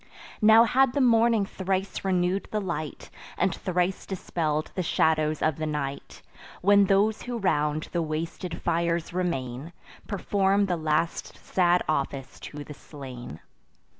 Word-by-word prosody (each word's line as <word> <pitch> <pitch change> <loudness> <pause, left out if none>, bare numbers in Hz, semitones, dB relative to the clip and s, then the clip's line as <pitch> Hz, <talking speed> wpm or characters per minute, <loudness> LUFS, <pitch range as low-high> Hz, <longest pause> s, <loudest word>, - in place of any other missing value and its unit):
Now 220 +1 +8
had 255 +2 +3
the - - 0
morning 230 -4 +4
thrice 190 0 -3
renew'd 185 0 0
the 215 - -1
light, 165 -6 -5 0.3
And - - +1
thrice 180 +1 -1
dispell'd 155 -5 -2
the 185 - -2
shadows 155 -2 +1
of 155 -3 +1
the 155 0 -2
night, 140 -2 -5 0.4
When 200 +1 +6
those 205 +3 +2
who 245 -1 -4
round 150 -6 0
the 170 - 0
wasted 165 +2 -4
fires 170 0 0
remain, 160 -4 -3 0.3
Perform 200 0 +1
the 180 -2 0
last 160 +1 -1
sad 180 -1 +2
office 135 -3 -2
to 145 0 -8
the 150 - -9
slain. 130 - -10
175 Hz, 135 wpm, -26 LUFS, 155-195 Hz, 0.4 s, Now